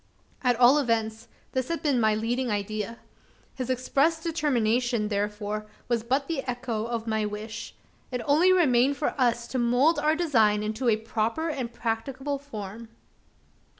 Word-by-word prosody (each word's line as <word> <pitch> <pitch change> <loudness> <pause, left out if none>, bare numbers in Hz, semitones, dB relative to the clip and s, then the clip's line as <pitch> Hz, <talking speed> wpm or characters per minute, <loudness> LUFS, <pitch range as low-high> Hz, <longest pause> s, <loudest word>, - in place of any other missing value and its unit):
At 250 -1 +3
all 255 +4 +7
events, 225 -3 -1 0.2
this 260 -1 -1
had 335 - -3
been 280 -5 +2
my 215 -1 +3
leading 240 +3 -1
idea. 210 +2 -3 0.6
His 255 -1 -5
expressed 280 +6 +1
determination, 245 -8 +1
therefore, 210 +1 -2 0.2
was 235 -2 +1
but 265 +5 0
the 325 -5 -1
echo 240 -3 -2
of 235 -1 -3
my 220 -1 0
wish. 215 +2 -6 0.4
It 250 -2 -3
only 315 +6 +5
remained 280 -6 +4
for 300 - -1
us 235 -2 +2
to 260 - -2
mould 250 +7 +3
our 305 +1 +2
design 225 -11 +3
into 220 +4 -1
a 215 - +3
proper 225 +8 -1
and 255 -6 -3
practicable 260 +5 -3
form. 220 -5 -8
240 Hz, 150 wpm, -27 LUFS, 220-275 Hz, 0.6 s, all